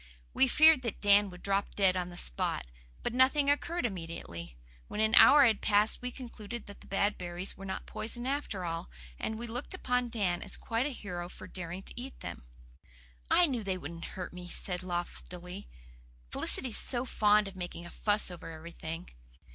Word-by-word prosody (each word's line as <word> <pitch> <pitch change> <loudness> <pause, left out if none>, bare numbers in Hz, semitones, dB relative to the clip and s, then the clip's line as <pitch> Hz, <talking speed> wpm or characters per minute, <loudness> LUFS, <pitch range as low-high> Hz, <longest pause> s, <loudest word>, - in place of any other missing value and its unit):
We 265 - +4
feared 315 +2 +7
that 230 -5 -4
Dan 205 0 +5
would 180 -1 -12
drop 200 0 0
dead 190 -2 +4
on 180 -1 -2
the 175 - -10
spot. - - +1 0.4
But - - -1
nothing 275 +3 +4
occurred 335 +2 0
immediately. 165 - -6 0.3
When - - -5
an 220 +1 +3
hour 285 +3 +9
had 220 -4 +3
passed 210 +1 +3
we 250 - -3
concluded 235 -3 -8
that 205 - -12
the - - -15
bad 200 +1 0
berries 175 +1 -4
were 195 - -9
not 190 - -4
poison 240 +2 -3
after 265 -9 -2
all, 165 - -4 0.3
and 220 - -2
we 235 - -5
looked 245 +9 -4
upon 250 -7 0
Dan 195 -7 0
as 195 - -4
quite 230 +4 -1
a - - -2
hero 180 -9 -6
for 185 - -10
daring 180 0 -5
to - - -6
eat 265 +1 -9
them. - - -7 0.8
"I 355 - +6
knew 255 -8 -2
they 190 -2 -1
wouldn't 165 0 -7
hurt 180 -1 -5
me," 180 0 -8
he - - -9
said 180 -1 -2
loftily. 180 +1 -5 0.6
"Felicity's 250 -5 +1
so 245 0 +4
fond 210 -3 +3
of 195 - -9
making 175 -1 -6
a 175 - -10
fuss 210 -2 +1
over 175 -1 -8
everything." 165 +1 -7
200 Hz, 190 wpm, -31 LUFS, 180-240 Hz, 0.8 s, hour